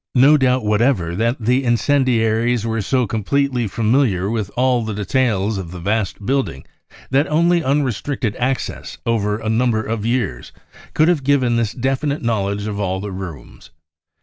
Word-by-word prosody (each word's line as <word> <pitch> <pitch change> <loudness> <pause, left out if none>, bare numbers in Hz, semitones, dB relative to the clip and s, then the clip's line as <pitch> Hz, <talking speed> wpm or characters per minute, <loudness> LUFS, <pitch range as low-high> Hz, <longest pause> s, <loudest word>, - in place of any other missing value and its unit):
BROWN 125 - +5
BOOK - - +7
OF 140 - +7
THE - - +7
HITLER - - +6
TERROR 135 -2 +2
no 125 0 +3
doubt 125 - -6
whatever 105 -6 +1
that 115 +5 0
the 125 +3 +2
incerfdiaries 120 -2 +1
were 115 -1 -1
so 125 +5 +1
com 110 0 -3
pletely 135 -2 0
familiar 110 -4 +1
with 110 -4 -2
all 125 -1 +2
details 105 -1 0
of 90 -3 -6
the 90 +1 -8
vast 100 +1 -2
building 130 - -1 0.5
that 140 +3 +3
only 170 +2 +2
unrestricted 135 -4 -1
access 130 +1 -3
over 105 -3 0
a 110 0 -6
number 110 0 +1
of 110 -1 -3
years 115 - -2 0.4
could 155 - +4
have 170 -6 +2
given 130 -3 +2
this 115 -2 0
definite 135 +3 -1
knowledge 100 -3 -1
of 105 -1 -4
all 95 -2 -1
the 100 +1 -5
rooms. 85 -5 -9
115 Hz, 180 wpm, -19 LUFS, 105-130 Hz, 0.5 s, BOOK